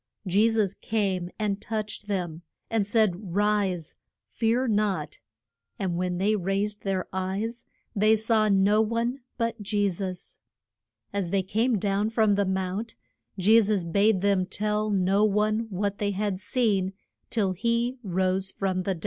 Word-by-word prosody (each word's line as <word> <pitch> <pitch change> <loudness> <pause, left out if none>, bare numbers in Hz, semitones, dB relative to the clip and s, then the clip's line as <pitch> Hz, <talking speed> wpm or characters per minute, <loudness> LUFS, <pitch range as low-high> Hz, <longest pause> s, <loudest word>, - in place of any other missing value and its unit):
Je 200 +5 +3
sus 215 -4 +1
came 195 -5 -1
and 210 -2 -1
touched 215 -1 -4
them, 175 -5 -3 0.3
and 220 -3 +1
said, 200 -4 +1
Rise. 200 -5 0 0.3
Fear 235 +2 0
not. 200 -8 0 0.6
And 185 -3 -2
when 180 0 -1
they 205 +4 +2
raised 200 +2 -1
their 190 -2 -2
eyes 195 +5 -3 0.3
they 215 +2 +4
saw 220 0 +2
no 200 +2 +4
one 230 +4 -1 0.2
but 230 -2 -2
Je 205 0 +1
sus. 185 0 -5 0.7
As 200 -4 -1
they 195 +1 +1
came 225 +5 +1
down 200 +2 0
from 220 -2 +3
the 200 0 +2
mount, 190 +4 -2 0.4
Je 215 +5 +6
sus 205 -3 +1
bade 200 +3 +2
them 195 -2 +2
tell 210 +2 -1
no 195 0 +2
one 215 +2 +1
what 200 +1 -2
they 205 - 0
had 200 -1 -2
seen 200 -4 +1 0.4
till 205 -5 +1
he 235 +6 -1
rose 190 -1 0
from 190 -1 -1
the 190 +1 -1
dead. - - -11
205 Hz, 150 wpm, -26 LUFS, 190-215 Hz, 0.7 s, Je